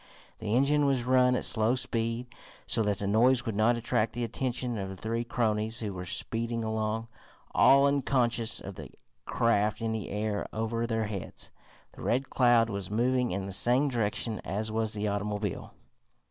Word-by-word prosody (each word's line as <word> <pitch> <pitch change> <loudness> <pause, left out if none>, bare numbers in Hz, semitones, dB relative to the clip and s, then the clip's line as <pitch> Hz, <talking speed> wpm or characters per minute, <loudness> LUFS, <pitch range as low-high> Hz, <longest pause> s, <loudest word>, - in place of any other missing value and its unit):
The 110 0 -1
engine 145 +3 +3
was 135 -3 +1
run 125 0 +4
at - - -1
slow 110 +2 +2
speed, 115 -1 -2 0.4
so 115 - +2
that 105 -2 0
the 100 - -3
noise 120 +5 +3
would 115 - -3
not 115 +3 +3
attract 115 -1 0
the 120 - -3
attention 120 0 -3
of 95 -1 -4
the 95 - -7
three 115 +4 -2
cronies 110 -2 -1
who 105 -3 -3
were 90 -1 -6
speeding 115 +4 -2
along, 110 +1 -2 0.5
all 140 +1 +6
unconscious 125 -5 +1
of 95 - -8
the 75 -5 -8 0.4
craft 110 -2 +1
in 115 0 -2
the 110 -2 -4
air 105 0 -2
over 115 +1 -2
their 115 -1 -1
heads. 100 -3 -7 0.4
The - - -13
Red 130 +3 -1
Cloud 120 -3 +4
was 100 -1 -4
moving 125 +3 +1
in 95 +1 -3
the 100 - -6
same 125 +8 +3
direction 115 -2 -1
as 110 +3 -3
was 110 0 -1
the 105 0 -2
automobile. 105 -1 -3
115 Hz, 175 wpm, -29 LUFS, 105-120 Hz, 0.5 s, all